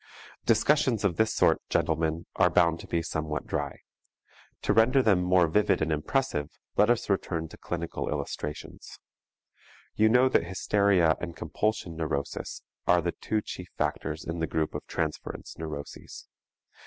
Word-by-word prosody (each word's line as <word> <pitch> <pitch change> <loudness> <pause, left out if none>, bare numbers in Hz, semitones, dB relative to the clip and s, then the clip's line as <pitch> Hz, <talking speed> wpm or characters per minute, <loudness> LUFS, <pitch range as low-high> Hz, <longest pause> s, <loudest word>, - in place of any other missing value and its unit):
Discussions 140 -7 +3
of 90 -4 +1
this 110 0 +3
sort, - - +3
gentlemen, 80 +1 0
are - - +4
bound 85 0 +3
to - - -10
be 85 -1 -1
somewhat 80 -2 -3
dry. - - -3 0.8
To - - +2
render 125 +4 +5
them 100 -6 +4
more 90 -1 +4
vivid 105 +7 +2
and 80 0 0
impressive, 75 - 0 0.3
let 105 - +4
us 120 -1 +2
return 85 -4 -1
to - - -12
clinical 85 -1 -4
illustrations. 75 +1 -5 1.0
You 110 +1 +4
know 125 +3 +5
that 130 - +2
hysteria 95 -2 +2
and 85 -2 -5
compulsion 85 +1 -2
neurosis 70 -4 -3 0.2
are 90 0 +5
the 85 - 0
two 110 +4 -2
chief 90 -1 -7
factors 80 0 -2
in 85 +1 -4
the 80 - 0
group 80 -1 -1
of - - -6
transference 80 -2 -4
neuroses. 75 -3 -7
85 Hz, 150 wpm, -28 LUFS, 80-105 Hz, 1.0 s, render